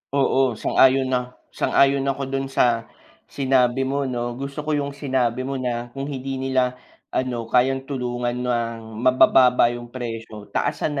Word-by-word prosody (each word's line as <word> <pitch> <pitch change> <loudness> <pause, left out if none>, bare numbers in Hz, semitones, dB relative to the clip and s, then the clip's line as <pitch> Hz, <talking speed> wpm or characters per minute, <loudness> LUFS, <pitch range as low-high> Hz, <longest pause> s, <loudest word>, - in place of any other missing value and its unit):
Oo, 135 -2 +2
sang-ayon 130 0 +4
a 125 0 -6 0.2
sang-ayon 140 0 +2
ako 135 0 -1
dun 135 0 -2
sa 120 -4 +1 0.4
sinabi 130 -2 +1
mo 140 +1 -1
'no, 120 -2 -3
gusto 140 +2 -5
ko 150 0 -1
yung 140 -1 -3
sinabi 130 -4 -1
mo 135 +1 -3
na 120 -1 -3
kung 135 +2 -6
hindi 135 -1 -4
nila 130 -1 0 0.3
ano 120 -3 -2
kayang 130 +2 +2
tulungan 125 -2 -2
ng 115 -2 -1 0.2
mabababa 125 -1 +5
yung 120 0 -8
presyo, 115 -4 -7
taasan 150 - -1
130 Hz, 145 wpm, -22 LUFS, 120-135 Hz, 0.4 s, mabababa